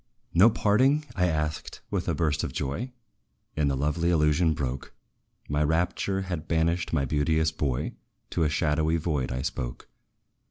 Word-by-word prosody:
"No 95 +7 +7
parting?" 130 +8 +3
I 90 0 +2
asked, 75 -2 -3
with - - -1
a - - +1
burst 75 -4 0
of - - -2
joy; 70 - -3 0.6
And 75 -2 +1
the 70 - +1
lovely 75 +5 0
illusion 80 0 +3
broke! 65 -2 -4 0.5
My 75 +1 +1
rapture 90 +5 0
had 90 -4 -4
banished 85 +1 +1
my 70 -4 +1
beauteous 80 +3 +1
boy 70 -5 -2 0.4
To - - -1
a 75 - +2
shadowy 80 +1 +1
void 75 -6 -1
I 65 +1 -2
spoke. - - -4
80 Hz, 155 wpm, -27 LUFS, 75-85 Hz, 0.6 s, No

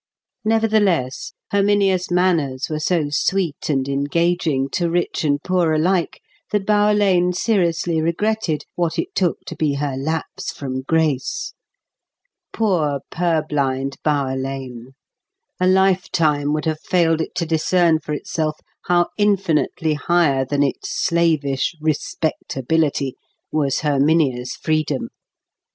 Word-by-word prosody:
Nevertheless, 215 - +1 0.2
Herminia's 200 -2 +2
manners 165 -7 +1
were 155 - -1
so 155 -2 0
sweet 170 0 -1
and 135 -2 0
engaging, 145 0 0
to 175 -2 0
rich 175 0 -1
and 145 -2 +1
poor 180 -3 +1
alike, 170 +2 0 0.3
that 205 -2 0
Bower 210 0 +3
Lane 180 -3 +3
seriously 175 -5 +1
regretted 170 0 -1
what 170 -2 -1
it 390 - -3
took 180 -3 0
to - - -7
be 150 -3 0
her 140 -1 -2
lapse 155 +4 -3
from 130 -2 -5
grace. 150 -2 -1 1.0
Poor 160 -11 0
purblind 145 -5 -1
Bower 140 -3 0
Lane! 130 -2 -6 0.7
A 180 - +2
lifetime 180 -6 +2
would 150 +1 -1
have 155 -1 -1
failed 165 -3 +2
it - - -5
to 170 - -1
discern 165 +1 +2
for 150 - -8
itself 155 +1 -2 0.3
how 175 -1 +3
infinitely 185 -6 +1
higher 150 -3 +2
than 145 +2 +1
its 140 - -2 0.2
slavish 160 -4 +1
"respectability" 150 -2 -1 0.4
was 140 -3 0
Herminia's 140 -4 +1
freedom. 155 -3 -1
160 Hz, 120 wpm, -20 LUFS, 145-180 Hz, 1.0 s, Bower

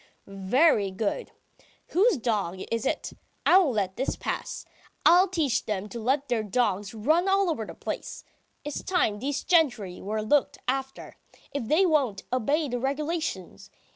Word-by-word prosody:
"Very 200 - +2
good. 210 - -3 0.6
Whose 395 +1 +3
dog 210 -7 -1
is 230 -1 0
it? - - -2 0.3
I 370 - +7
won't 295 - +1
let 190 -3 -1
this 265 - -1
pass! - - -4 0.4
I'll 360 +3 +7
teach 320 -9 0
them 210 -2 -2
to 235 - -6
let 270 +5 0
their 235 -2 0
dogs 210 -2 -1
run 315 - +2
all 390 -2 +3
over 225 -8 -4
the - - -9
place! - - -6 0.4
It's 295 - -4
time 225 - 0
these 275 +4 -2
gentry 245 - +1
were 215 +2 -3
looked 280 +6 +2
after, 265 +1 -3 0.4
if 280 -4 -3
they 330 - +4
won't 270 - +1
obey 285 +6 +1
the 245 -2 -3
regulations! 275 - -3
255 Hz, 155 wpm, -27 LUFS, 210-315 Hz, 0.6 s, I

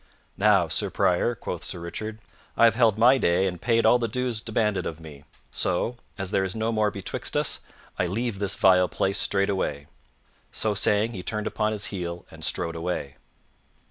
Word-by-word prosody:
"Now, 100 -4 +4
Sir - - -1
Prior," - - +1
quoth - - -5
Sir - - -5
Richard, 110 +6 -6 0.4
"I 115 - +7
have 115 - +5
held 115 -3 +3
my 125 +4 +6
day 85 -1 +2
and 90 -2 -3
paid 115 -1 +2
all 125 - +6
the 115 - 0
dues 120 -1 -2
demanded 105 -3 0
of 80 -1 -6
me; 75 -3 -12 0.3
so, 95 +7 -1 0.2
as 95 -2 -4
there 95 - +2
is 95 +1 -3
no 110 +1 0
more 110 -2 +2
betwixt 100 -2 -4
us, - - 0 0.4
I 90 - +2
leave 110 +2 -2
this 100 -1 0
vile 90 -1 +5
place 100 +1 0
straightway." 95 -8 0 0.7
So 110 -1 0
saying, 105 +2 +2
he 95 - -5
turned 105 +3 -3
upon 110 0 0
his 105 -1 -3
heel 85 -2 -5
and - - -11
strode 85 0 -1
away. 80 -5 -4
100 Hz, 185 wpm, -26 LUFS, 90-110 Hz, 0.7 s, I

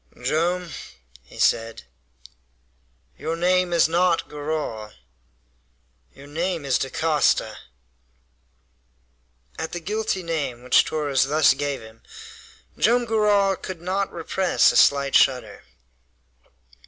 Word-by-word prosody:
"Joam," 170 +6 -1 0.5
he 60 - -17
said, 115 - 0 1.4
"your 160 - -3
name 180 +1 +1
is 170 -2 +4
not 170 +1 +1
Garral. 145 -8 -5 1.2
Your 135 - -13
name 165 +2 -3
is 135 -2 +1
Dacosta!" 150 +3 0 2.0
At 160 - -5
the 175 - -3
guilty 205 +1 -3
name 145 -8 -4
which 125 - +4
Torres 145 -4 0
thus 150 +2 +4
gave 140 0 -3
him, 110 0 -15 0.8
Joam 240 +2 +3
Garral 210 -3 +2
could 185 -2 -8
not 190 +3 -2
repress 175 +2 +1
a - - -6
slight 140 -1 +4
shudder. 130 -2 +2
160 Hz, 105 wpm, -23 LUFS, 140-180 Hz, 2.0 s, is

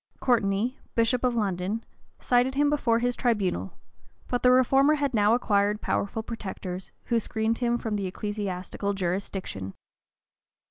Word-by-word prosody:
[*] - - -37
Courteney, 230 +1 +1 0.2
bishop 230 +2 +2
of 250 -1 +2
London, 200 +1 -1 0.4
cited 250 +2 +2
him 290 +1 +3
before 240 -6 +2
his 245 +1 0
tribunal; 195 - 0 0.5
but 245 - -1
the 250 - +5
reformer 270 +4 +5
had 285 -3 -1
now 210 0 +4
acquired 205 -3 +1
powerful 220 +2 -2
protectors, 190 -5 -6
who 235 -1 +1
screened 220 +1 -1
him 240 -1 +1
from 220 -3 -3
the 195 -2 -2
ecclesiastical 200 0 -3
jurisdiction. 185 - -3
220 Hz, 140 wpm, -27 LUFS, 195-245 Hz, 0.5 s, the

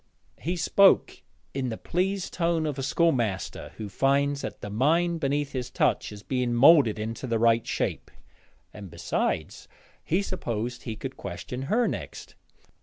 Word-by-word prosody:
He 175 +4 -2
spoke 195 +3 +4 0.3
in 130 -2 -2
the 110 - -4
pleased 190 +2 -2
tone 170 -2 +1
of 145 -3 -3
a - - -1
schoolmaster 125 - 0
who 110 - -5
finds 140 +6 +1
that - - -6
the 105 - -6
mind 165 +9 +2
beneath 145 -1 -1
his 125 -2 -4
touch - - 0
is 105 -1 -10
being 125 -1 -1
moulded 135 -3 +6
into 110 +4 -4
the 115 -1 +1
right 115 0 +3
shape; - - -2 0.6
and 100 -3 -9
besides - - -2 0.4
he 180 +5 +1
supposed 120 - -4
he 115 - -5
could 130 +4 -7
question 100 +7 -6
her 235 +2 +3
next. - - -6
135 Hz, 155 wpm, -27 LUFS, 115-165 Hz, 0.6 s, moulded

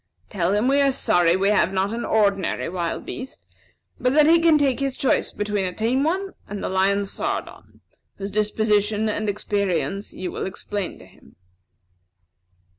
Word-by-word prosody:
Tell 185 -1 0
him 210 +4 +1
we 280 +1 +4
are 280 - +4
sorry 175 -9 +2
we 195 +1 +2
have 200 -3 +3
not 195 +2 0
an 235 - -3
ordinary 200 -4 +1
wild 170 -1 -3
beast; 260 +1 -7 0.6
but 250 +1 +1
that 300 -1 +6
he 330 +2 +6
can 330 -2 +5
take 275 -3 +1
his 275 -1 -2
choice 270 - +1
between 205 -1 -2
a 180 -1 -2
tame 245 +5 +1
one 380 +5 -1
and 205 0 -6
the - - -2
lion 195 +2 +2
Sardon, - - -5 0.3
whose 200 0 -6
disposition 210 0 +1
and 210 0 -1
experience 200 -1 -2
you 185 -1 -5
will - - -4
explain 195 0 -5
to - - -15
him." - - -21
205 Hz, 170 wpm, -23 LUFS, 195-255 Hz, 0.6 s, that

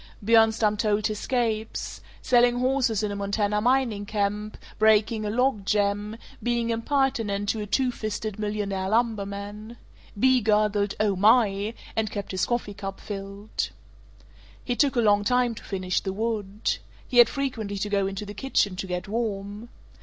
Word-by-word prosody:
Bjornstam 220 -1 +4
told 210 0 +1
his 215 -2 -1
scapes: 225 -4 -2 0.2
selling 245 0 +4
horses 250 -4 +1
in 210 - -1
a - - -3
Montana 205 +1 0
mining 240 -4 +1
camp, 210 0 -2 0.2
breaking 220 0 +3
a - - -1
log 245 -1 +1
jam, 205 +1 0 0.2
being 235 -1 0
impertinent 225 -5 0
to 220 - 0
a 210 - -4
"two 255 +4 +1
fisted" 215 -2 -4
millionaire 205 -2 -2
lumberman. 210 0 -2 0.4
Bea 260 +1 +4
gurgled 210 -1 +2
"Oh 210 -2 +2
my!" 210 +1 +3 0.2
and 220 -1 0
kept 205 -1 -5
his 185 -1 0
coffee 240 -4 -2
cup 195 -1 -6
filled. 200 +1 -5 1.0
He 245 - -1
took 280 +1 +2
a 240 - +3
long 205 -2 +4
time 245 +2 +2
to - - -11
finish 185 -2 -1
the 190 - -3
wood. 210 -1 -2 0.3
He 245 - +3
had 240 - +8
frequently 230 -8 -3
to 200 - -2
go 200 -1 +1
into 195 +1 -5
the 205 - -7
kitchen 205 -4 0
to 190 - -4
get 180 0 -4
warm. 210 0 -3
215 Hz, 160 wpm, -26 LUFS, 200-230 Hz, 1.0 s, had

